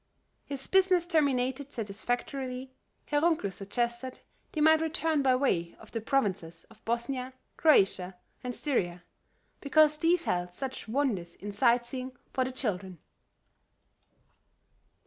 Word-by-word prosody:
His 275 -1 -5
business 375 -2 +4
terminated 280 -4 +1
satisfactorily, 250 +4 -3 0.3
Herr 290 -1 +1
Runkel 315 - +1
suggested 235 +6 -3 0.3
they 310 - -4
might 315 +1 +6
return 320 -1 +1
by 260 -2 +4
way 180 -11 0
of 220 - -14
the 230 - -3
provinces 200 - -1
of 220 -1 -19
Bosnia, 250 +3 -2 0.2
Croatia 190 - +3 0.3
and 250 -1 -3
Styria, 180 - -1 0.6
because 305 +1 +4
these 335 +2 +3
held 180 - -1
such 265 +1 -5
wonders 215 -9 -1
in 205 +1 -7
sightseeing 245 +4 +1 0.2
for 260 - +2
the 255 - -3
children. 195 -8 -3
255 Hz, 120 wpm, -30 LUFS, 205-285 Hz, 0.6 s, might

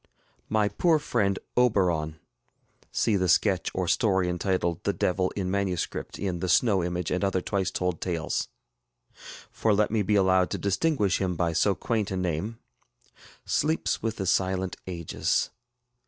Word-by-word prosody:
My 110 -1 +2
poor 160 - +2
friend 105 -10 0 0.2
ŌĆ£OberonŌĆØ 90 -10 +2 0.8
[See 110 - +1
the 90 -1 0
sketch 95 +1 +3
or 95 -1 -1
story 95 -3 +2
entitled 90 -1 -1
ŌĆ£The - - -1
Devil 90 0 +1
in 95 -2 -2
Manuscript, 95 -3 -2
ŌĆØ - - -7
in 90 -2 -2
ŌĆ£The 90 - -2
Snow 100 -2 +3
Image, 90 -1 -2
and 90 - 0
other 95 -1 +1
Twice 95 0 -1
Told 90 -2 -2
Tales.ŌĆØ] 80 -7 -6 0.3
for 110 -2 +1
let 105 0 +2
me 110 -1 +2
be 105 +1 +1
allowed 95 -2 +3
to - - -2
distinguish 100 - +1
him 90 -2 0
by 85 0 0
so 95 +4 +2
quaint 110 +1 -1
a 95 - -2
name 90 +5 -2 0.9
sleeps 155 +2 0
with 115 -1 -2
the 95 - -3
silent 95 0 0
ages. 85 -3 -1
95 Hz, 155 wpm, -27 LUFS, 90-105 Hz, 0.9 s, sketch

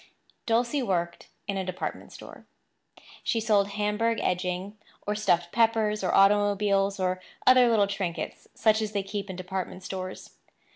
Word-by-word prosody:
Dulcie 240 +5 +1
worked 175 -7 -2 0.2
in 200 -1 -2
a 190 - -1
department 185 0 -5
store. - - -12 0.8
She 230 - 0
sold 210 -3 +2
Hamburg 210 +3 0
edging, 180 +2 -2 0.3
or 210 - 0
stuffed 175 -5 +1
peppers, 220 -2 +2
or 185 - +1
automobiles, 200 0 +3
or 185 0 -1 0.2
other 255 -1 +7
little 215 -3 +4
trinkets 195 -4 -4
such 220 0 +3
as 215 -1 -3
they 200 -1 -1
keep 200 0 -5
in 190 - -5
department 185 0 -5
stores. 185 -1 -6
200 Hz, 145 wpm, -27 LUFS, 185-215 Hz, 0.8 s, other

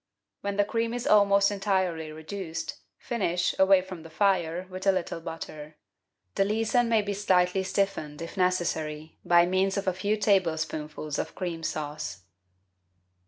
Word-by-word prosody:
When 200 0 -3
the 205 - +4
cream 230 +2 -1
is 245 - -4
almost 200 -1 +5
entirely 190 -6 -1
reduced, 160 +1 -6 0.2
finish, 180 -7 -1
away 190 -1 +6
from 185 -3 -8
the 165 - -11
fire, 175 0 +1
with 185 +1 -6
a - - +7
little 180 -3 -3
butter. 155 -2 -8 0.6
The - - +2
leason 225 +3 +1
may 220 -2 +3
be 205 0 -2
slightly 190 -2 +2
stiffened, 190 -6 -2
if 165 0 -7
necessary, 160 -4 -1
by 175 0 +5
means 190 +2 +1
of 200 - -2
a 185 - +2
few 205 +4 0
tablespoonfuls 160 -7 0
of - - -4
cream 175 -3 -4
sauce. 150 - -4
185 Hz, 150 wpm, -27 LUFS, 160-200 Hz, 0.6 s, a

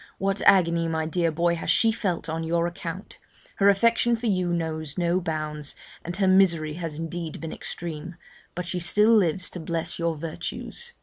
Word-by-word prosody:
What 195 +1 -1
agony, 170 -3 +5
my 160 -1 -1
dear 165 +1 +1
boy, 170 +2 +1
has - - -4
she 225 - +4
felt 195 -6 -2
on 165 +1 -3
your 170 +1 +1
account! 175 +2 -6 0.4
her 200 0 +5
affection 230 +3 +3
for 230 +1 -6
you 185 -5 +1
knows 160 -3 -3
no 175 0 +2
bounds, 155 -3 -4 0.3
and 175 +2 -5
her 195 -1 +2
misery 170 -5 +4
has 165 -2 -5
indeed 165 0 -5
been 160 - -5
extreme; 165 0 -6 0.4
but 180 - -3
she 180 +1 -2
still 210 +6 +4
lives 185 -2 +2
to 180 - -6
bless 165 0 -3
your 170 -1 0
virtues.' 165 - -5
170 Hz, 180 wpm, -25 LUFS, 160-190 Hz, 0.4 s, agony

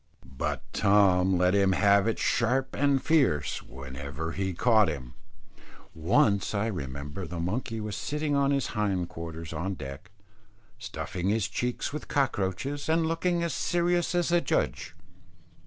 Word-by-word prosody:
But 65 0 -4
Tom 95 -2 +4
let 90 +1 +3
him 100 -1 +3
have 100 +2 +4
it 115 - 0
sharp 130 +3 +1
and 140 0 +2
fierce, 130 - +1
whenever 70 +4 -6
he 95 +2 -2
caught 110 +2 +4
him. 65 -6 -5 0.8
Once 100 +5 +2
I 100 +2 +1
remember 75 - -5
the 85 0 -5
monkey 110 +6 -2
was 105 -2 -4
sitting 150 0 -1
on 140 0 +3
his 140 -2 +1
hind 100 -5 0
quarters 80 0 -7
on 95 +5 -3
deck, 70 +5 -8 0.7
stuffing 90 +1 -4
his 110 -1 +1
cheeks 125 +3 -3
with 150 - -5
cockroaches, 135 - -1
and 165 0 +3
looking 170 +1 0
as 170 -4 -1
serious 175 +3 +1
as 175 -1 +1
a 175 0 +4
judge. - - -1
100 Hz, 145 wpm, -28 LUFS, 85-140 Hz, 0.8 s, Tom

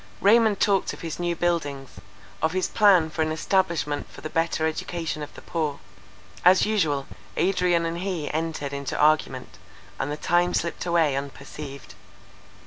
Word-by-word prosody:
Raymond 215 0 +4
talked 200 -3 +2
of - - -10
his 165 -1 -5
new 175 -1 0
buildings; 145 -6 -2 0.4
of 160 +1 +1
his 185 -1 0
plan 185 -7 +4
for 160 - -3
an 155 0 +1
establishment 160 -3 0
for - - -12
the 155 - -6
better 165 -1 0
education 160 0 -3
of 150 - -6
the - - -11
poor; 155 -4 -2 0.6
as 185 +1 +6
usual 155 -11 +1 0.3
Adrian 180 -3 +2
and 165 +1 -3
he 180 -5 -3
entered 155 -3 -2
into 140 -1 -4
argument, 150 -4 +1 0.4
and 135 - -2
the 150 - -3
time 175 +2 +2
slipped 170 +1 -2
away 165 -5 +3
unperceived. 140 -2 -7
165 Hz, 155 wpm, -25 LUFS, 150-180 Hz, 0.6 s, as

